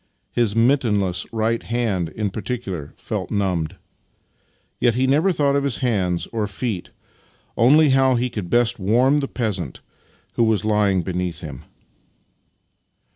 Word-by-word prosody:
His 115 -3 +1
mittenless 110 -7 +2
right 115 0 0
hand 110 -8 -1
in 105 +2 -3
particular 100 - -5
felt - - -4
numbed. 95 -4 -1 1.0
Yet 120 -2 +3
he 130 +1 +2
never 150 +8 +3
thought 145 -4 +1
of 140 - +1
his 140 -4 -1
hands 95 -8 0
or 110 -2 -1
feet 100 -2 -4 0.4
— - - -33 0.3
only 145 +7 +5
of 140 - +3
how 130 -1 +4
he 125 +1 0
could 105 -7 -5
best 120 0 +2
warm 125 +9 +3
the 140 - -2
peasant 105 -9 -3 0.5
who 115 - +2
was 110 -2 +1
lying 105 -4 +2
beneath 90 -1 -3
him. 75 -2 -8
110 Hz, 145 wpm, -22 LUFS, 95-125 Hz, 1.0 s, only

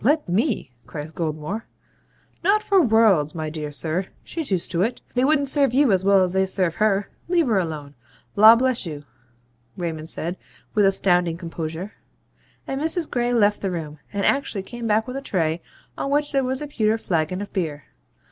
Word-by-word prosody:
let 295 +6 +2
ME,' 200 - 0 0.2
cries 150 0 -7
Goldmore. 160 +7 -3 0.8
'Not 415 +4 +3
for 390 -2 +4
worlds, 215 - +3
my 155 -1 -3
dear 150 -2 -5
sir. 160 +6 -2 0.2
She's 325 -4 -4
used 185 -3 -1
to 170 -1 0
it. 230 +5 0
They 250 - +2
wouldn't 285 0 +3
serve 275 -3 +3
you 280 -4 +4
as 190 -1 +2
well 195 -1 +5
as 180 -1 -1
they 190 0 +2
serve 185 -3 +1
her. 205 0 +1 0.2
Leave 340 -2 +2
her 220 -6 +2
alone. 155 -5 -4 0.4
Law 220 +3 +9
bless 255 0 +1
you!' 150 -5 -6 0.7
Raymond 160 -3 -4
said, 175 +3 -4 0.4
with 205 -2 +4
astounding 180 -3 +2
composure. 165 +2 -5 0.7
And 270 +1 -3
Mrs. 320 +1 0
Gray 245 0 0
left 210 -3 +3
the 195 - -1
room, 155 -4 -5
and 200 -1 -1
actually 250 -8 0
came 235 +3 -6
back 220 +1 +2
with 250 +1 -4
a - - -4
tray 165 - -1 0.4
on - - -2
which 290 +1 +1
there 275 -2 +1
was 260 +3 -2
a - - -5
pewter 220 -5 +1
flagon 175 -3 -1
of 205 0 -7
beer. 155 -6 -2
200 Hz, 185 wpm, -23 LUFS, 165-250 Hz, 0.8 s, Law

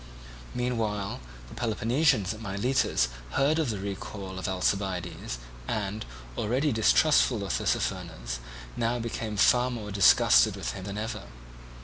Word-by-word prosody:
Meanwhile 110 -5 -1 0.3
the - - -12
Peloponnesians 115 - +1
at 110 - -10
Miletus 110 - +1 0.3
heard 150 +4 +3
of 155 -6 +1
the 105 - -2
recall 95 -1 -6
of 95 - -3
Alcibiades 95 -7 -1 0.3
and, 105 0 -3 0.3
already 130 +7 +1
distrustful 115 0 +4
of 95 - -2
Tissaphernes, - - -2 0.4
now 120 +1 0
became 115 -2 -4
far 125 +4 +4
more 110 -4 -5
disgusted 95 -10 +5
with - - -3
him 95 -2 -7
than 100 +1 -5
ever. 110 -1 -4
105 Hz, 125 wpm, -28 LUFS, 100-120 Hz, 0.4 s, disgusted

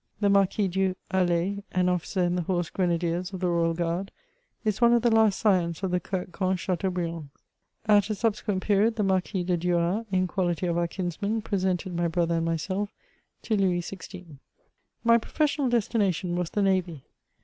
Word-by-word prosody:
The 205 -1 +2
Marquis 200 +1 +3
du 190 0 0 0.2
Hallay, 185 +1 +1
an 180 0 +2
officer 180 +1 0
in 175 0 +1
the 180 - 0
Horse 175 -1 -1
Grenadiers 175 0 -1
of 185 - -4
the 180 -1 0
Royal 165 -1 +1
Guard, 175 +3 -2 0.6
is 215 +1 0
one 235 0 +6
of 235 -1 +3
the 235 -2 +3
last 220 -3 +4
scions 180 -4 +1
of 190 - 0
the 180 - +2
Coetquen 185 +1 -2
Chateau 185 +1 -1
briands. 170 -4 -4 0.6
At 205 -1 +4
a 215 - 0
subsequent 210 -2 -1
period, 210 +2 +2
the 210 - 0
Marquis 190 -1 0
de 180 0 0
Duras, 175 +5 0
in 185 -1 +2
quality 180 -2 -1
of 170 -1 0
our 170 0 +1
kinsman, 200 +5 -3
presented 185 -3 -1
my 170 0 +1
brother 170 0 0
and 165 - 0
myself 185 +5 -2 0.5
to 220 - 0
Louis 185 -3 +2
XVI. 180 -4 -10 0.6
My 230 0 +5
professional 285 +2 0
destination 200 -7 0
was 175 -1 -1
the 205 - 0
navy. 180 -7 0
185 Hz, 180 wpm, -27 LUFS, 175-200 Hz, 0.6 s, one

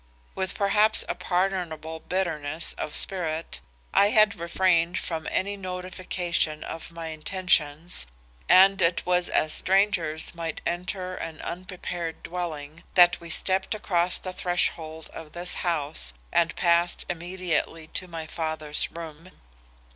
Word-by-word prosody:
With 190 0 -2
perhaps 210 +2 +4
a - - 0
pardonable 175 -4 -1
bitterness 160 -4 -2
of 150 - -5
spirit, 165 -4 +1 0.3
I 200 - +6
had 215 -1 +5
refrained 170 0 +2
from 160 -2 -3
any 200 +2 0
notification 180 -4 -2
of 165 - -7
my 165 -1 -6
intentions, 160 - +1 0.4
and 195 +1 +7
it 170 0 +2
was 180 0 +2
as 155 - +3
strangers 185 -5 +2
might 165 -2 -4
enter 180 +2 -3
an 165 -3 -6
unprepared 175 -1 -5
dwelling, 165 -3 -5
that 175 -1 +6
we 170 - -9
stepped 190 +4 +1
across 180 -4 +1
the 185 - -5
threshold 160 -3 -2
of 155 -2 -9
this 175 +1 -2
house 145 - 0 0.2
and 165 -2 +2
passed 170 0 +2
immediately 175 -2 -2
to 185 - -4
my 165 -2 -6
father's 155 -2 -2
room. 165 +1 -9
175 Hz, 125 wpm, -26 LUFS, 160-185 Hz, 0.4 s, and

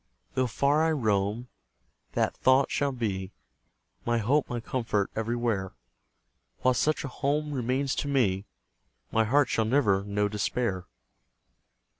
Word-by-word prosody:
Though 130 -1 +1
far 140 +6 +2
I 160 - +2
roam, 110 -2 0 0.7
that - - 0
thought 130 +1 +3
shall 140 -1 +1
be 100 -6 -3 0.7
My 120 0 +1
hope, 130 +7 +1
my 120 - -2
comfort, 110 -4 -1
everywhere; 115 -4 -1 0.9
While 130 - +4
such 155 +5 +1
a - - -3
home 150 +3 -1
remains 130 +1 0
to - - -1
me, 105 -8 +1 0.6
My 110 0 +3
heart 140 +4 +3
shall 110 - +1
never 110 -6 +2
know 105 0 0
despair! 105 -2 -2
120 Hz, 130 wpm, -28 LUFS, 105-135 Hz, 0.9 s, While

